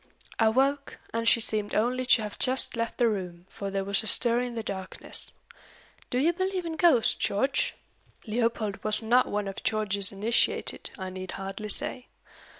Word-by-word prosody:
I 225 -1 +5
woke, 275 +4 0 0.2
and 230 0 +2
she - - +4
seemed 215 -2 -1
only 250 +3 0
to 235 -3 +5
have 210 -1 -7
just 260 0 +2
left 230 0 -3
the 240 - +3
room, 180 -5 -4
for 200 - -5
there 195 0 -2
was 200 +1 +2
a 220 - -5
stir 235 +2 +3
in 245 -1 -3
the 225 - -3
darkness. 190 -3 -4 0.8
Do 245 - -1
you 315 +7 +3
believe 375 0 -2
in 325 -1 -4
ghosts, 315 -8 +4
George?" 265 +7 0 0.5
Leopold 225 -2 -1
was 215 +1 +4
not 245 +3 +3
one 205 -1 -2
of 195 - -6
George's 205 -2 +1
initiated, 210 +4 0
I 190 -1 -6
need 185 0 -7
hardly 195 +2 -6
say. 250 +4 +1
225 Hz, 175 wpm, -27 LUFS, 200-250 Hz, 0.8 s, I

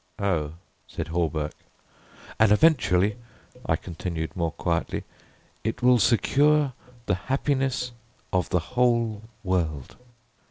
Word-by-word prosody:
"Oh," 80 -7 0 0.3
said - - -5
Hawberk. 80 -3 -1 0.9
"And 110 -1 +5
eventually," 105 - +4 0.5
I 80 - +3
continued 85 -1 -5
more 85 -2 0
quietly, 85 0 -2 0.6
"it 110 +3 -3
will 125 -1 +6
secure 140 +5 +3 0.3
the 100 - +1 0.2
happiness 135 -2 0 0.4
of 90 -1 +1
the - - +2 0.2
whole 115 -4 +2 0.2
world." 80 -8 -1
100 Hz, 105 wpm, -26 LUFS, 85-125 Hz, 0.9 s, will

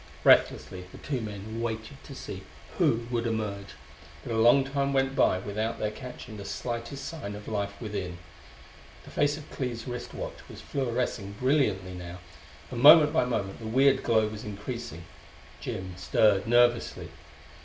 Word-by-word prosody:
Breathlessly 90 -1 +4
the - - -11
two 135 -5 -3
men 110 +1 -6
waited 115 +3 -4
to 140 - -9
see 95 -6 -7 0.4
who 115 +1 +3
would 120 -1 0
emerge, 105 -3 -3 0.5
but 120 - -4
a 110 - +2
long 120 +4 +6
time 140 0 -1
went 135 0 +1
by 90 - +4
without 105 +4 -3
their 105 - -1
catching 125 -2 -9
the 100 - -7
slightest 120 +6 -4
sign 120 -12 -5
of 105 0 -10
life 100 -2 -3
within. 100 -5 -4 0.9
The - - -13
face 145 0 +1
of 155 -1 -10
Clee's 120 -3 -4
wrist 125 -1 -6
watch - - -6
was - - -10
fluorescing 120 -6 -2
brilliantly 105 -7 +1
now, 90 0 -7 0.5
and 120 -1 -3
moment 150 +1 +9
by 160 -6 +3
moment 105 -6 -2
the 110 - -6
weird 135 +4 +4
glow 110 -2 +3
was 105 0 -7
increasing. 105 -2 -6 0.6
Jim 95 0 -5
stirred 100 +2 +3
nervously. 120 0 +3
115 Hz, 160 wpm, -28 LUFS, 100-130 Hz, 0.9 s, moment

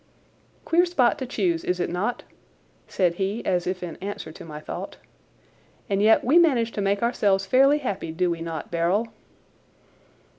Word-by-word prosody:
"Queer 340 +2 +4
spot 295 -4 +2
to 260 - -4
choose, 180 -8 -1
is 180 0 -1
it - - 0
not?" 200 +8 -2 0.6
said 180 -3 +1
he 200 +4 -2
as 180 -2 0
if 185 0 -3
in 170 -3 -6
answer 200 -4 -6
to - - -11
my 150 -2 -8
thought. 155 - -7 0.9
"And 195 0 +1
yet 220 +1 +5
we 300 +8 +5
manage 250 -9 +3
to 205 - -4
make 200 +2 0
ourselves 200 -5 +1
fairly 270 +7 +4
happy, 200 - -4
do 175 +2 0
we 165 -1 -4
not, 165 -2 -6
Beryl?" 175 +7 0
195 Hz, 170 wpm, -24 LUFS, 175-240 Hz, 0.9 s, yet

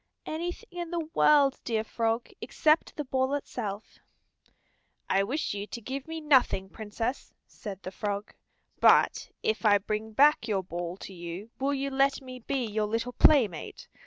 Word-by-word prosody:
"Anything 350 +8 -5
in 345 -1 -4
the 330 -2 -4
world, 285 -3 +4
dear 220 -2 -1
Frog, 225 +1 -1
except 310 +1 +2
the 300 - -3
ball 260 +1 0
itself." 215 -7 -5 1.1
"I 195 - +3
wish 265 +7 -2
you 205 0 -5
to 235 - -6
give 265 +5 -6
me 325 0 -5
nothing, 260 -10 +3
Princess," 225 +5 -5
said 200 -3 -9
the 185 - -6
frog. 205 +2 -4 0.5
"But - - +4
if 220 +2 0
I 205 -2 +6
bring 215 +2 -4
back 285 -1 +5
your 200 -4 0
ball 175 0 -5
to 195 - -9
you 175 +5 -7
will 280 +1 +1
you 275 0 -2
let 275 +1 +2
me 255 -1 -9
be 255 +1 -2
your 215 -1 -1
little 230 +3 -2
playmate? 220 - +3
230 Hz, 160 wpm, -28 LUFS, 205-275 Hz, 1.1 s, I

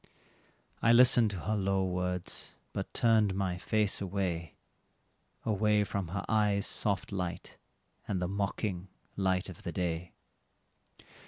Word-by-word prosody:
I 115 - +5
listened 120 -2 +7
to 95 -4 -5
her 105 +8 -1
low 95 -1 +1
words, 90 -1 -3 0.2
but - - -4
turned 110 -4 +3
my 95 -2 -1
face 105 +1 +1
away 90 -4 -2 0.9
Away 105 0 +3
from 100 -2 -3
her 100 +4 -4
eyes' 105 -2 +2
soft 100 -1 -1
light, 90 -2 -4 0.5
and 95 - -1
the 90 - -1
mocking 100 -1 -2 0.3
light 95 -1 +1
of 95 -4 -10
the 85 - -4
day. 85 0 -3
95 Hz, 130 wpm, -31 LUFS, 90-105 Hz, 0.9 s, listened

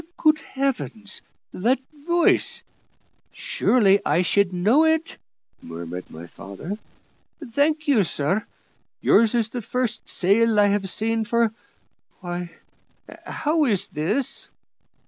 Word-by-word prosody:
"Good 310 -1 +3
Heaven! 265 -7 -3 0.5
that 240 +8 +1 0.3
voice 345 0 +2 0.7
surely 200 -5 +2
I 165 +5 +2
should 200 +1 +2
know 210 - +3
it," 320 0 0 0.4
murmured 85 +2 -7
my 80 +2 -10
father. 100 - -8 0.7
"Thank 300 +6 +1
you, 250 -8 +4
sir. 160 +6 0 0.6
Yours 225 +2 +4
is 225 -2 +1
the 245 +1 -5
first 250 +2 -3
sail 210 +4 +3
I 205 0 +5
have 200 -1 0
seen 225 +3 0
for 235 0 +1 0.7
Why, 175 -1 -5 0.8
how 310 0 +1
is 205 -8 +1
this?" 200 - -1
220 Hz, 110 wpm, -23 LUFS, 180-255 Hz, 0.8 s, I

